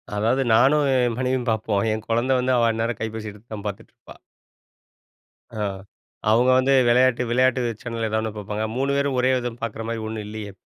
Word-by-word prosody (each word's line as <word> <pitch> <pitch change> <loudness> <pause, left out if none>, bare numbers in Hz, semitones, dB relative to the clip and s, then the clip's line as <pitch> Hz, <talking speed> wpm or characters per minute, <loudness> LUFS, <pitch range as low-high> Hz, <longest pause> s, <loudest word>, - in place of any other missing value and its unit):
அதாவது 115 +6 +1
நானும், 140 +5 +4
என் 120 -2 +1
மனைவியும் 130 -1 -1
பார்ப்போம். 105 -2 0
என் 110 0 -5
கொழந்த 120 +3 +1
வந்து, 130 +1 +1
அவ 115 -1 +3
அந்நேரம் 115 +2 -2
கைப்பேசி 110 -1 -4
எடுத்து 105 +3 -18
தான் 105 0 -7
பார்த்துட்டுருப்பா. 100 - -10 1.4
ஆ. - - -3 0.7
அவங்க 120 +3 +4
வந்து 135 +1 +3 0.2
வெளையாட்டு 125 0 +3
விளையாட்டு 130 +1 +3 0.2
சேனல் 115 -2 -3
ஏதாவது 110 - 0
ஒண்ணு 110 -1 -3
பார்ப்பாங்க. 105 +1 -3
3 135 +1 0
பேரும் 140 -2 0
ஒரே 130 +1 +3
இத 120 -1 -3
பார்க்குற 115 0 -4
மாரி 115 -1 -3
ஒண்ணும் 110 -1 -5
இல்லையே! 105 -1 -7
115 Hz, 175 wpm, -23 LUFS, 110-130 Hz, 1.4 s, நானும்